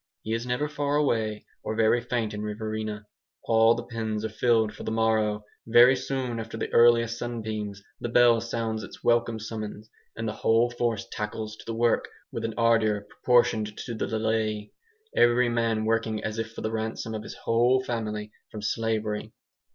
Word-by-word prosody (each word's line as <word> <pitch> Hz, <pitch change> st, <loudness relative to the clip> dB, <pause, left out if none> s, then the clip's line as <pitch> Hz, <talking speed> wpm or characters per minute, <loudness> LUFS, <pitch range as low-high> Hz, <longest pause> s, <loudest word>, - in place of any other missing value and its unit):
He 110 Hz, -, -2 dB
is 115 Hz, +2 st, -2 dB
never 125 Hz, +4 st, 0 dB
far 145 Hz, -1 st, -1 dB
away 110 Hz, -7 st, 0 dB, 0.2 s
or 110 Hz, -, -3 dB
very 115 Hz, +2 st, +3 dB
faint 115 Hz, -2 st, -2 dB
in 105 Hz, -, -4 dB
Riverina. 110 Hz, 0 st, -4 dB, 0.4 s
All 115 Hz, 0 st, +5 dB
the -, -, -4 dB
pens 110 Hz, -2 st, -3 dB
are -, -, -2 dB
filled 110 Hz, -1 st, +2 dB
for -, -, -11 dB
the -, -, -3 dB
morrow; 110 Hz, -1 st, +1 dB, 0.2 s
very 120 Hz, +3 st, +7 dB
soon 130 Hz, -2 st, -3 dB
after 115 Hz, 0 st, -6 dB
the -, -, -4 dB
earliest 115 Hz, 0 st, +5 dB
sunbeams 110 Hz, -4 st, -4 dB, 0.2 s
the 120 Hz, -, -3 dB
bell 120 Hz, -1 st, +5 dB
sounds 115 Hz, -1 st, -2 dB
its -, -, -11 dB
welcome 120 Hz, -1 st, +2 dB
summons, 110 Hz, -1 st, -6 dB, 0.2 s
and 115 Hz, 0 st, -3 dB
the 105 Hz, -, -2 dB
whole 115 Hz, +2 st, +2 dB
force 120 Hz, -3 st, -1 dB
tackles 110 Hz, 0 st, -4 dB
to -, -, -13 dB
the 115 Hz, -, -3 dB
work 115 Hz, 0 st, +2 dB, 0.2 s
with 115 Hz, -, -4 dB
an 115 Hz, -1 st, -3 dB
ardour 115 Hz, -3 st, +3 dB
proportioned 110 Hz, 0 st, +1 dB
to 120 Hz, -, -5 dB
the 110 Hz, -, -2 dB
delay, 110 Hz, -1 st, -1 dB, 0.4 s
every 120 Hz, +1 st, +4 dB
man 115 Hz, -2 st, 0 dB
working 110 Hz, -1 st, 0 dB
as 110 Hz, +1 st, -3 dB
if 115 Hz, 0 st, -3 dB
for -, -, -8 dB
the 110 Hz, -, -2 dB
ransom 110 Hz, 0 st, -3 dB
of 110 Hz, -, -3 dB
his -, -, -8 dB
whole 120 Hz, +3 st, +2 dB
family 105 Hz, -3 st, -3 dB, 0.2 s
from 105 Hz, -1 st, -8 dB
slavery. 110 Hz, -1 st, -1 dB
115 Hz, 180 wpm, -27 LUFS, 110-120 Hz, 0.4 s, very